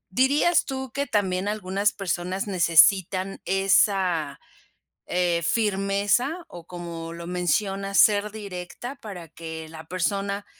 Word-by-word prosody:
¿dirías 285 +7 +3
tú 265 -2 -5
que 280 +1 -2
también 190 -2 0
algunas 200 -1 0
personas 185 0 -3
necesitan 185 +1 +3
esa, 190 -6 +2 0.7
eh, 175 -1 0
firmeza? 205 - 0
O 175 -1 -11
como 170 -2 -7
lo 170 0 -8
mencionas 195 +3 0
¿ser 210 0 +4
directa? 205 +5 -7
Para 180 -6 -8
que 160 0 -8
la 160 0 -10
persona 200 +3 -2
195 Hz, 115 wpm, -25 LUFS, 175-205 Hz, 0.7 s, ser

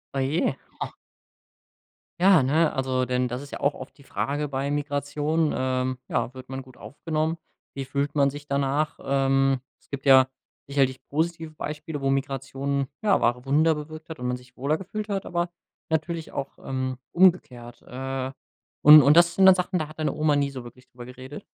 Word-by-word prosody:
Oh - - 0
je, 135 +1 0 0.3
oh. - - -4 1.2
Ja, 185 -5 +6
ne, 155 +4 +3
also, 130 -1 0
denn 125 0 0
das 125 +2 -5
ist 145 - -11
ja - - -6
auch 140 - +1
oft - - -11
die 140 - -17
Frage 145 +2 -2
bei 140 0 -2
Migration, 145 +2 -1
ähm, 130 0 -1
ja, 125 - -1
wird 130 -1 -11
man 135 0 -5
gut 130 -1 -17
aufgenommen? 160 +2 -3 0.4
Wie 135 - -4
fühlt 140 +2 -2
man 140 -1 +4
sich 145 +1 -9
danach? 140 +2 0
Ähm, 135 -1 +2 0.2
es - - -30
gibt 140 0 -6
ja 130 -1 +7 0.4
sicherlich 135 -2 0
positive 160 +1 -2
Beispiele, 150 0 -6
wo 135 - 0
Migration, 135 0 -2 0.2
ja, 210 -2 +4
wahre 120 +1 +1
Wunder 155 +4 +3
bewirkt 155 +2 -8
hat 160 -2 -8
und 125 - -3
man 125 0 -1
sich 125 0 -19
wohler 145 +4 0
gefühlt 210 +4 -6
hat, 195 -1 -2
aber 175 0 -1 0.4
natürlich 160 +1 -2
auch, 140 0 -5
ähm, 130 -1 -2
umgekehrt. 145 -10 +2
Äh, 130 +1 -5 0.5
und 150 +1 +10
und 145 +4 +5
das 170 -1 +5
sind 190 - +5
dann 190 -1 +9
Sachen, 180 0 -1
da 155 -3 -3
hat 155 +1 -14
deine 155 - 0
Oma 150 -1 +2
nie 140 -1 0
so 130 -2 -7
wirklich 125 +2 -14
drüber 120 0 -11
geredet? 130 +3 -10
140 Hz, 190 wpm, -25 LUFS, 130-155 Hz, 1.2 s, und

